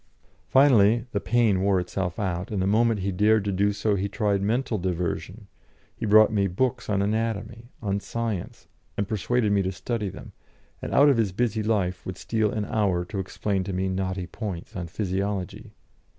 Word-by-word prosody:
Finally 120 Hz, -5 st, +5 dB
the 100 Hz, -, 0 dB
pain 110 Hz, -4 st, +2 dB
wore 95 Hz, -1 st, +3 dB
itself 90 Hz, 0 st, -3 dB
out, 90 Hz, -2 st, -2 dB
and 105 Hz, -, -2 dB
the 95 Hz, -, +1 dB
moment 110 Hz, +1 st, +2 dB
he 100 Hz, +1 st, -1 dB
dared 105 Hz, +2 st, +3 dB
to 100 Hz, -, 0 dB
do 100 Hz, +2 st, +2 dB
so, 105 Hz, +1 st, 0 dB
he 100 Hz, 0 st, -1 dB
tried 100 Hz, -2 st, 0 dB
mental 115 Hz, +1 st, 0 dB
diversion; 90 Hz, +3 st, -3 dB, 0.5 s
he -, -, -4 dB
brought 110 Hz, +1 st, +6 dB
me 100 Hz, -2 st, +2 dB
books 110 Hz, +8 st, -1 dB
on 100 Hz, -1 st, +1 dB
anatomy, 110 Hz, +2 st, -2 dB
on 100 Hz, -1 st, 0 dB
science, 115 Hz, -3 st, -4 dB, 0.3 s
and 100 Hz, -, -1 dB
persuaded 110 Hz, +1 st, 0 dB
me 100 Hz, -1 st, +3 dB
to 95 Hz, 0 st, -1 dB
study 105 Hz, +1 st, -3 dB
them; -, -, -10 dB, 0.5 s
and -, -, -5 dB
out 145 Hz, -, +6 dB
of 140 Hz, -4 st, +4 dB
his 110 Hz, -4 st, +1 dB
busy 110 Hz, +2 st, 0 dB
life 100 Hz, -4 st, 0 dB
would 95 Hz, -1 st, -6 dB
steal 110 Hz, 0 st, 0 dB
an 105 Hz, 0 st, -2 dB
hour 95 Hz, -5 st, 0 dB
to 100 Hz, +2 st, -5 dB
explain 95 Hz, +1 st, -2 dB
to 95 Hz, -, -4 dB
me 95 Hz, +1 st, -1 dB
knotty 95 Hz, 0 st, -2 dB
points 95 Hz, -3 st, -6 dB
on 90 Hz, -3 st, -4 dB
physiology. 100 Hz, +2 st, -3 dB
100 Hz, 185 wpm, -25 LUFS, 95-110 Hz, 0.5 s, brought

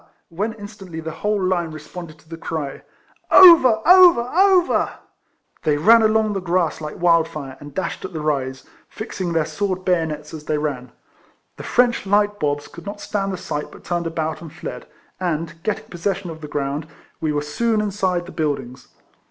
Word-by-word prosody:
when 200 Hz, +6 st, -2 dB
instantly 205 Hz, -6 st, -9 dB
the 160 Hz, 0 st, -5 dB
whole 210 Hz, 0 st, +1 dB
Hne 180 Hz, -3 st, 0 dB
responded 155 Hz, +1 st, -9 dB
to 155 Hz, -, -24 dB
the 165 Hz, -, -7 dB
cry, 155 Hz, -4 st, -5 dB, 0.3 s
" -, -, -33 dB
Over! 260 Hz, -12 st, +8 dB
over! 360 Hz, -7 st, +8 dB
over 375 Hz, -1 st, +3 dB, 0.3 s
!" -, -, -41 dB
They 150 Hz, -1 st, +2 dB
ran 225 Hz, +10 st, +6 dB
along 215 Hz, -1 st, +2 dB
the 195 Hz, -, -1 dB
grass 175 Hz, -3 st, 0 dB
like 150 Hz, -1 st, -6 dB
wildfire, 165 Hz, -5 st, +1 dB
and 145 Hz, -1 st, -12 dB
dashed 190 Hz, -, -3 dB
at 190 Hz, -, -6 dB
the 160 Hz, -, -5 dB
rise, 135 Hz, -3 st, -2 dB, 0.2 s
fixing 190 Hz, -5 st, -5 dB
their 165 Hz, -2 st, +1 dB
sword 185 Hz, -1 st, -3 dB
bayonets 160 Hz, -4 st, -1 dB
as 155 Hz, -1 st, -8 dB
they 155 Hz, -, 0 dB
ran. 135 Hz, -5 st, -3 dB, 0.7 s
The -, -, -7 dB
French 240 Hz, -4 st, +1 dB
light 205 Hz, +1 st, +2 dB
bobs 145 Hz, -1 st, -1 dB
could 170 Hz, +3 st, -12 dB
not 205 Hz, +1 st, -6 dB
stand 195 Hz, -2 st, -2 dB
the 185 Hz, -, -4 dB
sight, 150 Hz, -3 st, -5 dB
but -, -, -14 dB
turned 175 Hz, -1 st, -2 dB
about,' 160 Hz, -1 st, -3 dB
and 165 Hz, -3 st, -9 dB
fled; 160 Hz, +1 st, -8 dB, 0.3 s
and, 165 Hz, -2 st, -3 dB
getting 215 Hz, +2 st, -2 dB
possession 180 Hz, +1 st, -3 dB
of 160 Hz, 0 st, -10 dB
their 150 Hz, -, -8 dB
ground, 145 Hz, +1 st, -3 dB, 0.3 s
we 155 Hz, -1 st, -1 dB
were 145 Hz, 0 st, -1 dB
soon 220 Hz, +9 st, 0 dB
inside 190 Hz, -4 st, -1 dB
the 185 Hz, -, -10 dB
build 150 Hz, -3 st, -1 dB
ings. 125 Hz, 0 st, -12 dB
170 Hz, 185 wpm, -21 LUFS, 155-205 Hz, 0.7 s, Over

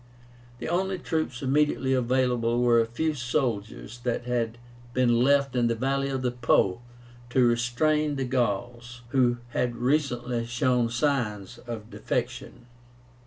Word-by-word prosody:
The 120 Hz, -, -6 dB
only 190 Hz, +3 st, 0 dB
troops 155 Hz, -7 st, -3 dB
immediately 135 Hz, -1 st, +2 dB
available 125 Hz, -2 st, +1 dB
were 120 Hz, -1 st, +5 dB
a 115 Hz, -, -1 dB
few 155 Hz, +7 st, -1 dB
soldiers 120 Hz, -4 st, -3 dB
that 120 Hz, 0 st, -2 dB
had 120 Hz, -1 st, -1 dB, 0.4 s
been 120 Hz, -2 st, +3 dB
left 140 Hz, 0 st, +3 dB
in 120 Hz, -1 st, +3 dB
the 115 Hz, -, +1 dB
valley 135 Hz, +3 st, 0 dB
of 135 Hz, -1 st, -2 dB
the 125 Hz, -, +1 dB
Po 120 Hz, -5 st, +2 dB, 0.5 s
to 125 Hz, 0 st, +3 dB
restrain 145 Hz, +6 st, +1 dB
the 135 Hz, -1 st, -2 dB
Gauls, 120 Hz, 0 st, -2 dB
who 125 Hz, -2 st, +2 dB
had 120 Hz, 0 st, -1 dB
recently 120 Hz, -3 st, 0 dB
shown 120 Hz, 0 st, +1 dB
signs 120 Hz, -6 st, -1 dB
of 115 Hz, -2 st, -7 dB
defection. 120 Hz, -, -4 dB
125 Hz, 135 wpm, -27 LUFS, 120-135 Hz, 0.5 s, were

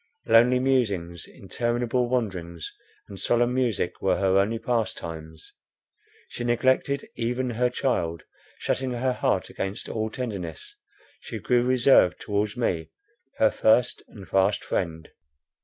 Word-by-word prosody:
Lonely 120 Hz, +3 st, +5 dB
musings, 100 Hz, -10 st, 0 dB
interminable 120 Hz, +1 st, -1 dB
wanderings, 90 Hz, -10 st, -3 dB, 0.3 s
and 100 Hz, -2 st, -10 dB
solemn 120 Hz, +1 st, +2 dB
music 120 Hz, -8 st, -1 dB
were 95 Hz, -, +2 dB
her 95 Hz, 0 st, +3 dB
only 110 Hz, +4 st, +1 dB
pastimes. 85 Hz, -, -4 dB, 0.7 s
She 120 Hz, -, -6 dB
neglected 130 Hz, +3 st, +1 dB
even 125 Hz, +2 st, -1 dB
her 125 Hz, +2 st, +1 dB
child; 85 Hz, -11 st, -1 dB, 0.3 s
shutting 130 Hz, -1 st, -1 dB
her 125 Hz, +1 st, 0 dB
heart -, -, 0 dB
against 95 Hz, +1 st, -4 dB
all 110 Hz, 0 st, -2 dB
tenderness, 100 Hz, -10 st, -6 dB, 0.4 s
she -, -, -7 dB
grew 125 Hz, -1 st, +2 dB
reserved 125 Hz, -6 st, +4 dB
towards 105 Hz, +1 st, -2 dB
me, 85 Hz, -9 st, -1 dB, 0.5 s
her -, -, +4 dB
first 120 Hz, +2 st, +3 dB
and 100 Hz, -4 st, -12 dB
fast 95 Hz, +1 st, +2 dB
friend. 80 Hz, -3 st, -3 dB
115 Hz, 125 wpm, -26 LUFS, 95-125 Hz, 0.7 s, Lonely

